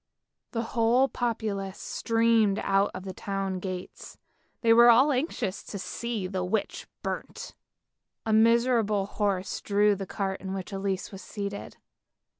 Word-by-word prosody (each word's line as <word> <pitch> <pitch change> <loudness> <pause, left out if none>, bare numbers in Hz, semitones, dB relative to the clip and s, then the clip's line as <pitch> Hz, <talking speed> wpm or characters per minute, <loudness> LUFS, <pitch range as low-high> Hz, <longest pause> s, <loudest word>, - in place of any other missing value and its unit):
The 230 -1 -2
whole 240 +3 +4
populace 215 -6 -3
streamed 225 -3 +2
out 195 +1 +2
of 185 - -6
the 190 -1 -6
town 195 -1 -3
gates, 185 -1 -7 0.4
they 230 -1 +5
were 235 +1 +8
all 260 +5 +6
anxious 250 - -2
to 200 - -6
see 225 +1 -4
the 185 0 -2
witch 200 +3 -2 0.2
burnt. - - -5 0.7
A 220 - +1
miserable 225 -2 +3
horse 200 -2 -2
drew 205 0 +3
the 195 -1 -5
cart 195 0 -3
in 190 0 -4
which 190 +1 -6
Elise 195 -1 -2
was 195 -1 -9
seated. 200 -1 -6
205 Hz, 140 wpm, -27 LUFS, 195-230 Hz, 0.7 s, were